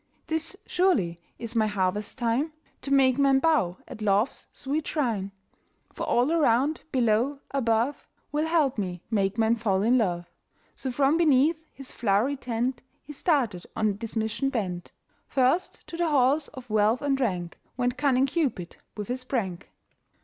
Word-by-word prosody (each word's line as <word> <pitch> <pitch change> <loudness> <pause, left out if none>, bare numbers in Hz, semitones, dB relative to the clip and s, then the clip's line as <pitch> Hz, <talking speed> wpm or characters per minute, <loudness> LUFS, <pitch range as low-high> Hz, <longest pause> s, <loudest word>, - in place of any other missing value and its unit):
"This 320 +4 -3
surely 210 - +1 0.2
is 235 0 -7
my 220 -1 +3
harvest 205 +1 -1
time, 255 +6 0 0.3
To 275 - -6
make 270 -1 +4
men 275 -1 +5
bow 270 - +2
at 215 - -10
Love's 210 +4 +1
sweet 290 +3 -3
shrine; 225 -10 -1 0.6
For - - -4
all 245 +5 +2
around, 290 -2 +2
below, 245 +3 +1
above, 240 +1 0 0.2
Will 300 +2 0
help 305 -8 +2
me 180 -3 -4
make 200 -1 +1
men 225 0 +3
fall 205 -4 0
in 245 +3 +4
love." 175 -5 0 0.5
So 260 - -4
from 275 +4 +3
beneath 315 0 +3
his 270 -2 -10
flow'ry 225 +5 +1
tent 250 0 -2 0.2
He 295 - -9
started 255 - 0
on 210 -2 0
this 230 +1 -7
mission 220 +5 0
bent. 185 -8 -3 0.4
First 270 +8 +1
to 335 - -8
the 340 -1 +1
halls 280 +1 +3
of 250 -3 -11
wealth 215 +4 +2
and 275 -1 +1
rank 180 -8 -2 0.2
Went 245 0 0
cunning 270 -2 +3
Cupid 270 - -2 0.2
with 205 -2 -4
his 255 +1 -3
prank. 200 -10 -3
250 Hz, 155 wpm, -27 LUFS, 210-280 Hz, 0.6 s, men